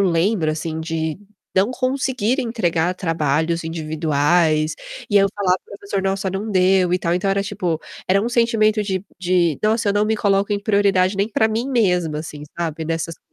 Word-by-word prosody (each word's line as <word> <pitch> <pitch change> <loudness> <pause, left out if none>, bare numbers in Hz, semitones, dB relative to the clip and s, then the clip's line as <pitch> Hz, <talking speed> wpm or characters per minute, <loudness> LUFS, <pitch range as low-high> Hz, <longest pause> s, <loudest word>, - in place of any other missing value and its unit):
lembro 170 0 +1
assim, 160 +1 -4
de 160 0 -3 0.4
não 195 +5 +3
conseguir 255 -1 0
entregar 180 -8 0
trabalhos 165 -1 0
individuais, 155 0 +1 0.4
e 205 - +3
eu 195 - +5
falava: 185 -3 +1
"Professor, 200 -1 -4
nossa 195 0 -1
não 200 +4 -4
deu 185 -1 +3
e - - +1
tal". 170 0 -1
Então, 185 +2 0
era 195 0 +1
tipo, 190 -5 -2 0.3
era 195 +2 +3
um 230 - -1
sentimento 225 -3 +2
de 190 -2 -3
de: 175 -4 +1
"Nossa 215 0 +1
eu - - +1
não 205 +1 +2
me 220 0 +1
coloco 200 0 +1
em 205 - +1
prioridade 200 -2 +2
nem 200 +2 +1
pra 220 0 +2
mim 225 +4 -2
mesma." 180 - +1
assim, 150 -2 -8 0.2
sabe, 160 -2 -3
nessas 165 0 -2
coisas - - -49
185 Hz, 180 wpm, -20 LUFS, 165-205 Hz, 0.4 s, eu